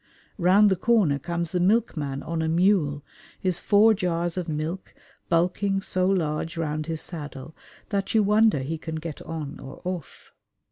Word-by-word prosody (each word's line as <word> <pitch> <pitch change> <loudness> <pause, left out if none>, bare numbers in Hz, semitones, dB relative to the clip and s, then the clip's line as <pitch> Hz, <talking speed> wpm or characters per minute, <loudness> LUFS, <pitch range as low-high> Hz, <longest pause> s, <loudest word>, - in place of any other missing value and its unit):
Round 195 +4 +5
the - - +4
corner 185 -8 +2
comes 170 +3 -3
the 180 - 0
milkman 175 -9 0
on 165 0 -3
a 160 - 0
mule, 165 -5 +2 0.4
his 185 -2 0
four 215 +2 +5
jars 175 -3 -1
of 180 -2 -3
milk 155 +5 -4 0.3
bulking 185 +4 +1
so 185 -1 0
large 165 -3 -1
round 155 -1 -2
his 160 -1 -3
saddle 150 -3 -8 0.3
that 200 +1 -2
you 220 - +5
wonder 210 -6 +4
he 155 +4 -4
can 160 0 -5
get 160 -2 -6
on 155 -3 -6
or 135 - -10
off. 180 -4 -6
170 Hz, 160 wpm, -25 LUFS, 155-195 Hz, 0.4 s, Round